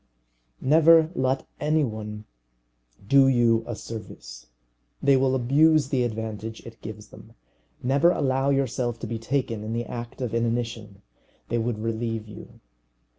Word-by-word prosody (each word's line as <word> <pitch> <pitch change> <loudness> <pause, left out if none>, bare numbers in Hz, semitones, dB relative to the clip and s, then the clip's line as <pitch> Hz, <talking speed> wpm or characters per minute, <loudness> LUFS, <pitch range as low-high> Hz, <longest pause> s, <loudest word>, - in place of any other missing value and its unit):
Never 160 +2 +5
let 130 -2 0
any 155 +1 +2
one 105 -3 -5 0.8
do 135 +2 +6
you 120 -3 +3
a 120 - -4
service. 65 - -9 0.5
They 140 -1 +4
will 130 0 +2
abuse 145 +3 +3
the 130 -3 +1
advantage 110 -1 -5
it 115 0 -12
gives 105 -1 -9
them. - - -15 0.5
Never 140 +6 +4
allow 135 -4 +1
yourself 125 -3 0
to - - -4
be 115 0 -4
taken 115 -3 -2
in 110 +1 -4
the 120 +1 -2
act 120 0 -7
of 125 -4 -3
inanition. 115 -3 -2 0.5
They 120 - 0
would 115 -1 -1
relieve 115 0 -3
you. 105 - -12
120 Hz, 140 wpm, -25 LUFS, 110-135 Hz, 0.8 s, do